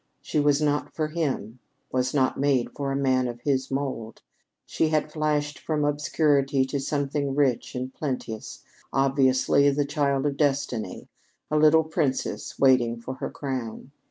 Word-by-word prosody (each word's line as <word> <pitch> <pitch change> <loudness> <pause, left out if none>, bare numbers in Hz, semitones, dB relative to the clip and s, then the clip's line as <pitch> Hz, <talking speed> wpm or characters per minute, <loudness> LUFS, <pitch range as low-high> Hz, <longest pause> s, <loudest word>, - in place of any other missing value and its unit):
She 155 - -2
was 145 -1 +3
not 150 -1 0
for 155 -1 -1
him 135 -8 -3 0.3
was 130 0 0
not 135 -3 +1
made 135 -3 +1
for 140 -1 -2
a - - -1
man 130 -2 +2
of 120 0 -6
his 135 -1 0
mould. 135 -5 -4 0.4
She 160 - 0
had 155 -1 0
flashed 150 -1 -1
from 150 -2 -1
obscurity 145 -2 +2
to 140 +1 -3
something 140 0 -1
rich 135 -4 +1
and 130 +1 -4
plenteous, 125 -6 -5 0.3
obviously 135 +1 +3
the 145 +1 +1
child 140 -1 0
of 140 -1 -1
Destiny 140 -6 -1 0.4
a - - +1
little 155 +1 +6
princess 150 -4 -2
waiting 125 -3 +3
for 125 +3 -6
her - - -4
crown. 130 -2 -5
140 Hz, 155 wpm, -26 LUFS, 130-145 Hz, 0.4 s, little